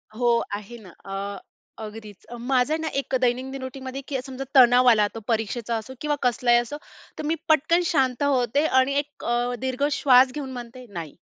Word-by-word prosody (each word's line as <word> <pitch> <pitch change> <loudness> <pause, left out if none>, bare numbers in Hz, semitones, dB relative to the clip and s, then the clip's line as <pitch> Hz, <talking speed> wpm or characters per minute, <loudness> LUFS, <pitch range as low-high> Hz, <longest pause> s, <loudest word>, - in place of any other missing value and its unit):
हो, 235 -1 +2
आहे 210 +3 -9
ना, 185 - -13 0.2
अ, 195 +1 -5 0.4
अगदीच. 215 -2 -10
अ, 240 - -7
माझं 255 +4 +1
आहे - - +1
ना, 320 - -2
एक 270 -1 -3
दैनंदिन 255 +2 -1
रुटीनमध्ये, 260 +1 -6
की 270 -3 -2
समजा 265 0 -6
तणाव 250 -1 +7
आला, 210 -3 +4
तो - - -4
परीक्षेचा 230 +1 -1
असो 225 +4 -8
किंवा 300 -1 0
कसलाही 240 0 +3
असो, 240 +5 -2 0.4
तर - - -3
मी 320 +2 +1
पटकन 315 +3 +4
शांत 265 -4 +1
होते 280 +1 +2
आणि 260 +2 +2
एक 290 0 -8
अ, 240 +1 0
दीर्घ 260 +1 -2
श्वास 260 -2 +5
घेऊन 275 -3 -5
म्हणते, 245 0 -9
"नाही, 165 -4 -7
250 Hz, 185 wpm, -24 LUFS, 235-270 Hz, 0.4 s, तणाव